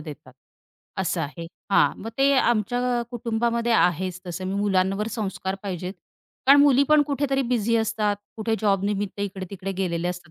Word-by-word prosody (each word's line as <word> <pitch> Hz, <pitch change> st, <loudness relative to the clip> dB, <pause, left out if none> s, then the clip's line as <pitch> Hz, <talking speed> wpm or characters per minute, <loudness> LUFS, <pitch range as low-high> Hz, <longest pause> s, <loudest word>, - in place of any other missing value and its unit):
देतात. 150 Hz, -4 st, -10 dB, 0.7 s
असं -, -, -1 dB
आहे. 165 Hz, +4 st, -5 dB, 0.2 s
हां, -, -, +3 dB
मग 220 Hz, -, -6 dB
ते 275 Hz, +1 st, +4 dB
आमच्या 240 Hz, +2 st, +1 dB
कुटुंबामध्ये 235 Hz, 0 st, -1 dB
आहेच 180 Hz, -2 st, +1 dB
तसं 180 Hz, +1 st, -5 dB
मी 190 Hz, -, -2 dB
मुलांवर 195 Hz, 0 st, +1 dB
संस्कार 195 Hz, -3 st, -3 dB
पाहिजेत. 185 Hz, -2 st, -4 dB, 0.5 s
कारण 280 Hz, +1 st, +8 dB
मुली 280 Hz, -2 st, +5 dB
पण 305 Hz, -1 st, +6 dB
कुठेतरी 275 Hz, -1 st, 0 dB
बिझी 235 Hz, -2 st, +1 dB
असतात, 220 Hz, -2 st, 0 dB, 0.2 s
कुठे 220 Hz, 0 st, -1 dB
जॉबनिमित्त 200 Hz, 0 st, 0 dB
इकडे-तिकडे 195 Hz, -1 st, -5 dB
गेलेले 175 Hz, -2 st, -2 dB
असतात 180 Hz, -2 st, -7 dB
205 Hz, 145 wpm, -24 LUFS, 185-235 Hz, 0.7 s, कारण